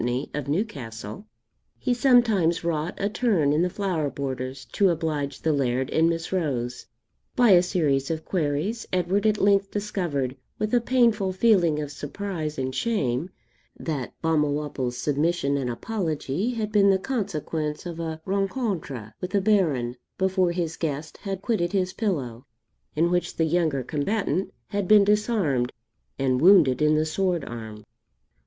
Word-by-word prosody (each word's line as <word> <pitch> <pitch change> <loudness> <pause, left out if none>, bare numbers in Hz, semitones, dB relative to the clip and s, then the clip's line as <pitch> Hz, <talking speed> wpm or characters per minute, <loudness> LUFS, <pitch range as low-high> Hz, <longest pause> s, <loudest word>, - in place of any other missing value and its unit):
of 145 -2 -4
Newcastle, 140 - -4 0.5
he 250 - 0
sometimes 230 -10 +3
wrought 165 0 -1
a 200 - 0
turn 205 - +2
in 155 - +2
the 180 - +2
flower 175 -6 -1
borders 130 -2 -5
to 200 -2 +2
oblige 155 -4 -2
the 160 - +1
Laird 130 -1 0
and 165 +1 +3
Miss 165 0 -3
Rose. 130 -10 -2 0.5
By 245 -4 +5
a 175 -2 +8
series 150 -7 0
of 160 -1 -3
queries, 170 +6 -1
Edward 185 +4 +1
at 215 -1 +2
length 200 -1 +3
discovered, 175 -11 -2 0.2
with 215 +1 -2
a 240 - +4
painful 230 -6 +2
feeling 185 -7 +3
of 145 -1 -4
surprise 155 +1 -5
and 130 0 -2
shame, 140 - -1 0.5
that 145 -6 -4
Balmawhapple's 145 -5 0
submission 145 0 0
and 135 -3 -1
apology 165 - -2
had 215 -2 -2
been 200 -2 +5
the 195 - +5
consequence 165 - -3
of 170 -1 -6
a 160 -1 -4
rencontre 190 - -2
with 180 - -3
the 200 - +2
Baron 150 - +1 0.2
before 190 -1 +2
his 170 -2 -2
guest 155 -1 -4
had 195 -1 -5
quitted 190 -7 0
his 185 -2 0
pillow, 135 - -3 0.5
in 170 +3 +2
which 175 -1 0
the 160 - +2
younger 160 -5 +1
combatant 175 - -1 0.2
had 200 -2 -2
been 210 0 +7
disarmed 200 - +1 0.5
and 130 -1 +1
wounded 160 -8 +6
in 150 0 +4
the 155 +1 +2
sword 175 0 0
arm. 110 -3 -8
165 Hz, 150 wpm, -25 LUFS, 140-200 Hz, 0.5 s, a